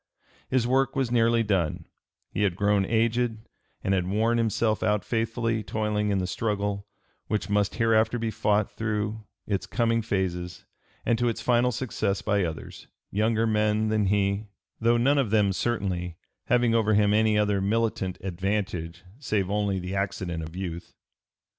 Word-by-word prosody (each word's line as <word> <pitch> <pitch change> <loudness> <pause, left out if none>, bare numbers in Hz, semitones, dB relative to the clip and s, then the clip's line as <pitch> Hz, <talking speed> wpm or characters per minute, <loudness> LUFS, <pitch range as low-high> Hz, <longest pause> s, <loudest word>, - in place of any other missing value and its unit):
His 130 -2 +2
work 135 +2 +2
was 135 -3 0
nearly 115 -1 +3
done; 95 -7 0 0.5
he - - -2
had 100 -4 +2
grown 100 0 +2
aged, 115 0 +1 0.5
and 95 - +1
had 90 -2 +1
worn 110 +4 +1
himself 110 -1 +1
out 105 -1 +1
faithfully 115 0 -1
toiling 105 -1 -1
in 100 - +1
the 95 - 0
struggle 100 0 -2 0.4
which 105 -1 -2
must 105 -1 +1
hereafter 115 0 +2
be 115 -1 -2
fought 105 -1 +1
through 110 0 -2 0.2
its 100 -2 -2
coming 115 -1 +1
phases 90 -4 -3 0.4
and 115 - +2
to 120 0 +2
its 115 - -3
final 125 0 +2
success 110 -5 -2
by 100 -2 +1
others, 80 -3 -6 0.2
younger 110 +2 +1
men 110 0 +1
than 105 -2 +1
he, 100 +1 +1 0.3
though 115 +1 +3
none 140 +4 +3
of 130 -6 +1
them 105 -2 +3
certainly 90 -6 -2 0.3
having 120 -1 +3
over 110 -2 +3
him 105 0 +4
any 110 0 +3
other 105 -2 +2
militant 105 -2 0
advantage 90 -2 -3 0.2
save 100 -9 -1
only 100 -2 0
the 90 +1 -4
accident 95 -4 -2
of 80 +1 -8
youth. 90 -2 -6
105 Hz, 160 wpm, -26 LUFS, 100-115 Hz, 0.5 s, him